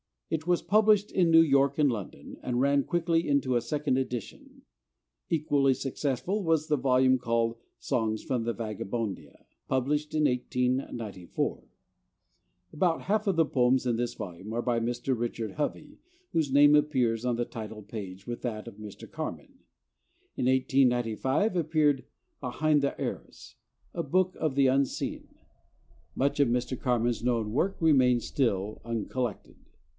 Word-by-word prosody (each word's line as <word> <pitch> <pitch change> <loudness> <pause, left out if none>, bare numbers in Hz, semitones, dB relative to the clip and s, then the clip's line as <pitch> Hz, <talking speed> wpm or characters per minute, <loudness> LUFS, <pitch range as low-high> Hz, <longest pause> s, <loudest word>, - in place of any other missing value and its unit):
It 160 +1 -2
was 175 -1 +2
published 210 -1 +3
in 180 -3 +3
New 165 0 +8
York 140 -2 +3
and 145 -3 +4
London, 105 -5 -7
and 125 -1 -1
ran 140 0 +3
quickly 170 -1 0
into 140 -3 +1
a - - 0
second 145 -1 -1
edition. 125 -5 -5 0.7
Equally 145 -4 +2
successful 135 - -2
was 160 -3 +1
the 150 - +3
volume 130 0 +3
called 115 -1 0 0.2
'Songs 110 -2 -1
from 125 -4 -2
Vagabondia,' 110 -1 -4 0.2
published 145 +4 -1
in 155 - +2
1894. 125 -7 -2 1.1
About 165 +1 +1
half 215 +2 0
the 165 -5 +3
poems 130 -2 +2
in 120 -2 +1
this 120 0 -2
volume 95 +5 -7
are 120 - 0
by 120 -1 0
Mr. 120 +3 -1
Richard 115 -2 -3
Hovey, 150 +2 -4 0.3
whose 155 -4 0
name 145 +2 +7
appears 130 -7 +1
on 125 -1 +1
the 120 0 -1
title 110 -2 -8
page 100 -2 -8
with 120 0 -5
that 110 -3 -4
of - - -16
Mr. 105 -2 -10
Carman. - - -6 0.8
In - - 0
1895 130 - +2
appeared 155 -4 +2 0.3
'Behind 145 +3 +1
the 140 - -2
Arras: - - -6 0.4
a - - -2
Book 185 +5 +1
of 155 -4 -1
the 140 -1 +4
Unseen.' 135 +1 -1 0.9
Much 140 +2 0
of 140 - +5
Mr. 125 +1 -1
Carman's 120 -2 0
known 115 -3 0
work 175 - 0
remains 130 -6 +4
still 105 -6 -1
uncollected. 115 0 -4
130 Hz, 140 wpm, -28 LUFS, 115-150 Hz, 1.1 s, New